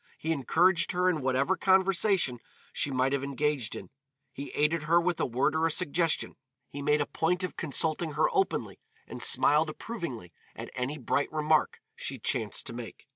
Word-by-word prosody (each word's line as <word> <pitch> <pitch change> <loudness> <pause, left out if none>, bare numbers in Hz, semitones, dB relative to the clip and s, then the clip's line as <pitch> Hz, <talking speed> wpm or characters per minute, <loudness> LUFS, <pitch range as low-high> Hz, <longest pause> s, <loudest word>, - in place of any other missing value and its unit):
He 160 - -3
encouraged 170 +5 +2
her 180 +1 +1
in 165 -5 +1
whatever 135 +7 +1
conversation 190 - +2 0.3
she - - 0
might 130 0 +1
have 140 -1 -1
engaged 140 -3 -1
in, - - -9 0.4
he 140 +1 -7
aided 150 +2 +1
her 170 +1 +6
with 175 0 -1
a - - +1
word 125 +5 0
or 160 +1 +2
a - - -1
suggestion, 165 -1 0 0.3
he 140 - -6
made 150 +1 +2
a - - +1
point 180 +5 -1
of 185 - -4
consulting 160 0 -1
her - - +2
openly, 390 -2 -1 0.3
and - - -9
smiled 155 +2 +4
approvingly 150 - -6 0.2
at - - -8
any 130 +4 -3
bright 140 +1 -1
remark 155 0 +1
she 135 - -4
chanced 115 -2 -1
to - - -5
make. 120 -1 -9
150 Hz, 180 wpm, -29 LUFS, 135-175 Hz, 0.4 s, her